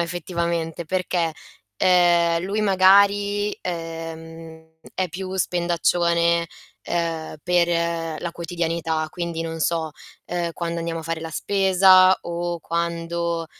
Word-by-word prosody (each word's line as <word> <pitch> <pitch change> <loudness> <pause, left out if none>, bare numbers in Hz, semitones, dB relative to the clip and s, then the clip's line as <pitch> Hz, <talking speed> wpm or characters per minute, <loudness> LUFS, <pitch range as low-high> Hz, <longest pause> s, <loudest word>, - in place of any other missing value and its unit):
effettivamente, 170 -1 -3
perché, 175 -2 -1 0.5
uhm, 175 -2 +4
lui 200 +3 -2
magari, 200 +1 +4
uhm, 165 -1 -7 0.2
è 185 -1 -1
più 185 +3 -6
spendaccione, 170 -1 +1 0.4
uhm, 165 -2 -2
per 170 -2 0
la 170 - -3
quotidianità, 165 -2 -2
quindi 170 -2 -4
non 165 0 -5
so, 160 -1 0 0.4
uhm, 170 -1 -2
quando 170 0 -4
andiamo 165 0 -3
a - - -9
fare 165 0 -4
la 165 0 -6
spesa, 190 0 +5
o 170 0 -3
quando, 170 0 -2
170 Hz, 110 wpm, -23 LUFS, 165-180 Hz, 0.5 s, spesa